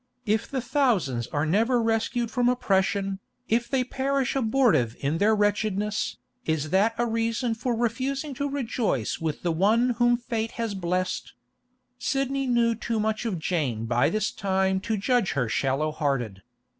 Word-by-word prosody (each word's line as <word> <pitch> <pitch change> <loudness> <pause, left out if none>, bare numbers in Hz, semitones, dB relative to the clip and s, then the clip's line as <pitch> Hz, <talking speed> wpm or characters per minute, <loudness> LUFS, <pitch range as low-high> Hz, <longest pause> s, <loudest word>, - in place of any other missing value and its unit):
If 220 +2 0
the 265 -2 -2
thousands 200 - +1
are 145 0 -1
never 225 +9 +2
rescued 230 +1 0
from 245 -1 +2
oppression, 195 -4 +1 0.3
if 235 +2 +1
they 265 -2 +1
perish 270 +1 -1
abortive 225 - +2
in 145 +4 -1
their 215 +2 +4
wretchedness, 205 0 0 0.3
is 155 -1 -1
that 210 +4 +3
a 240 - +1
reason 230 +1 0
for 235 +2 -2
refusing 265 +5 -1
to 285 +2 -2
rejoice 235 - -1
with 160 -3 -3
the 175 - +1
one 220 +9 +3
whom 240 0 +4
fate 230 -2 -3
has 230 -3 -3
blest? 185 -1 -2 0.7
Sidney 275 +1 -1
knew 235 -2 +3
too 225 0 -2
much 215 +2 -1
of 210 -6 -1
Jane 145 -10 -1
by 120 +1 +2
this 215 0 0
time 190 -1 0
to 220 - +1
judge 235 0 +1
her 125 -4 0
shallow 135 +6 0
hearted. 135 - -2
220 Hz, 155 wpm, -26 LUFS, 175-240 Hz, 0.7 s, their